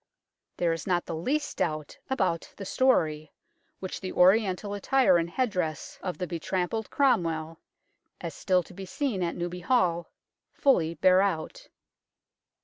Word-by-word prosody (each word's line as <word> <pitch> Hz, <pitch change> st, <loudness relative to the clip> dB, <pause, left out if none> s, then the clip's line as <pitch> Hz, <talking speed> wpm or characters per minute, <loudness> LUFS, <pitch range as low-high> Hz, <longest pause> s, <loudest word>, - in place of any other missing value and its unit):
There 170 Hz, -2 st, +2 dB
is 165 Hz, -, -6 dB
not 175 Hz, -2 st, +1 dB
the -, -, -5 dB
least 285 Hz, -, -2 dB
doubt 155 Hz, -3 st, -2 dB
about 190 Hz, -10 st, -1 dB
the 195 Hz, -, -6 dB
story, 155 Hz, -, +1 dB, 0.5 s
which 185 Hz, -, -6 dB
the 185 Hz, -, -4 dB
Oriental 195 Hz, +1 st, +3 dB
attire 205 Hz, -1 st, +3 dB
and 165 Hz, 0 st, -2 dB
headdress 180 Hz, -, -2 dB
of 180 Hz, -2 st, -4 dB
the 180 Hz, -, -2 dB
betrampled 180 Hz, +6 st, -2 dB
Cromwell, 165 Hz, -, +1 dB, 0.6 s
as -, -, -5 dB
still 185 Hz, -2 st, +1 dB
to 175 Hz, -, -15 dB
be 190 Hz, +1 st, -8 dB
seen 245 Hz, -4 st, -2 dB
at 170 Hz, -1 st, -1 dB
Newby 175 Hz, +1 st, -4 dB
Hall, 180 Hz, -4 st, +1 dB, 0.4 s
fully 170 Hz, -, +2 dB
bear 185 Hz, +1 st, +5 dB
out. 200 Hz, -, -2 dB
180 Hz, 140 wpm, -28 LUFS, 165-205 Hz, 0.6 s, bear